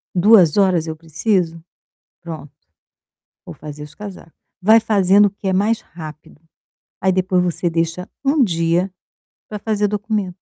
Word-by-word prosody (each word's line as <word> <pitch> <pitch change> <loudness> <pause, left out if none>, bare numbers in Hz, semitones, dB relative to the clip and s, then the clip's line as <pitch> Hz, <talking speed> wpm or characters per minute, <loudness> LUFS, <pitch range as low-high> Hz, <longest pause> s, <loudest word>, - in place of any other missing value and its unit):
2 185 -3 +5
horas 185 -5 +2
eu 160 - -4
preciso? 165 +1 -1 0.6
Pronto, 160 -4 -8 0.9
vou - - -8
fazer 150 0 -9
os 150 -1 -12
casaco. 195 -5 -10 0.3
Vai 220 +4 +6
fazendo 205 -2 +4
o - - -5
que 200 -1 -7
é 190 - +1
mais 220 +5 +1
rápido, 155 -2 -12 0.6
aí 190 0 +2
depois 185 -1 +1
você 175 0 -1
deixa 165 +2 -2 0.2
um 280 0 +3
dia 170 0 0 0.6
pra 210 - -6
fazer 210 -1 0
documento. 210 -3 -2
185 Hz, 145 wpm, -19 LUFS, 165-205 Hz, 0.9 s, Vai